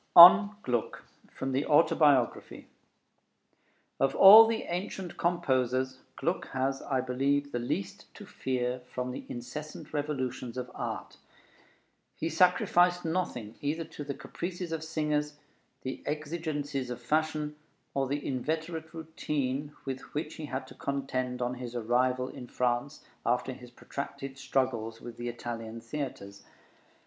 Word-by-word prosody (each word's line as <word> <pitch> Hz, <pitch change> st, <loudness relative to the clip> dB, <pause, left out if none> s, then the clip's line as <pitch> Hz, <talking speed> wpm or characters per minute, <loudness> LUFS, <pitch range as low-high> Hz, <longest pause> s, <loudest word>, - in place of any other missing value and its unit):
ON 200 Hz, +4 st, +11 dB
GLUCK 120 Hz, -3 st, -2 dB, 0.3 s
From 135 Hz, -, -4 dB
the 135 Hz, +2 st, +1 dB
Autobiography 145 Hz, -, +3 dB, 1.3 s
Of 135 Hz, -, +2 dB
all 215 Hz, +4 st, +11 dB
the 225 Hz, 0 st, -1 dB
ancient 180 Hz, +1 st, -4 dB
composers, 130 Hz, -6 st, 0 dB, 0.2 s
Gluck -, -, -1 dB
has, 135 Hz, +1 st, 0 dB
I 130 Hz, -2 st, 0 dB
believe, 140 Hz, +3 st, 0 dB
the 120 Hz, -, -1 dB
least 120 Hz, -4 st, -4 dB
to -, -, -10 dB
fear 125 Hz, -1 st, -2 dB
from 125 Hz, 0 st, -3 dB
the -, -, -7 dB
incessant 125 Hz, +7 st, -7 dB
revolutions 130 Hz, -4 st, -3 dB
of 125 Hz, 0 st, -4 dB
art. -, -, -5 dB, 1.0 s
He 165 Hz, -, -2 dB
sacrificed 180 Hz, +1 st, +4 dB
nothing 160 Hz, -, -2 dB
either 155 Hz, +3 st, -1 dB
to 160 Hz, -2 st, -8 dB
the 140 Hz, -1 st, -4 dB
caprices 175 Hz, 0 st, -5 dB
of 160 Hz, -1 st, -3 dB
singers, 150 Hz, -2 st, -1 dB, 0.5 s
the 130 Hz, -, -4 dB
exigencies 150 Hz, -3 st, -3 dB
of 125 Hz, 0 st, -5 dB
fashion, 150 Hz, +3 st, 0 dB, 0.4 s
or 135 Hz, -1 st, 0 dB
the 145 Hz, +2 st, -2 dB
inveterate 160 Hz, +5 st, -3 dB
routine 150 Hz, -3 st, -2 dB
with 135 Hz, -1 st, -3 dB, 0.2 s
which 150 Hz, -, -2 dB
he 155 Hz, -, -5 dB
had 130 Hz, -2 st, -4 dB
to -, -, -13 dB
contend 130 Hz, -2 st, -2 dB
on 120 Hz, +1 st, -1 dB
his 125 Hz, -1 st, -7 dB
arrival 125 Hz, +2 st, +1 dB
in 125 Hz, -, -9 dB
France, 125 Hz, +4 st, -1 dB, 0.2 s
after 125 Hz, +2 st, 0 dB
his 125 Hz, -1 st, -12 dB
protracted 135 Hz, +2 st, -7 dB
struggles 130 Hz, -4 st, -1 dB
with 120 Hz, -1 st, -9 dB
the 120 Hz, 0 st, -3 dB
Italian 115 Hz, -1 st, -6 dB
theatres. 115 Hz, -6 st, -6 dB
135 Hz, 135 wpm, -30 LUFS, 125-155 Hz, 1.3 s, ON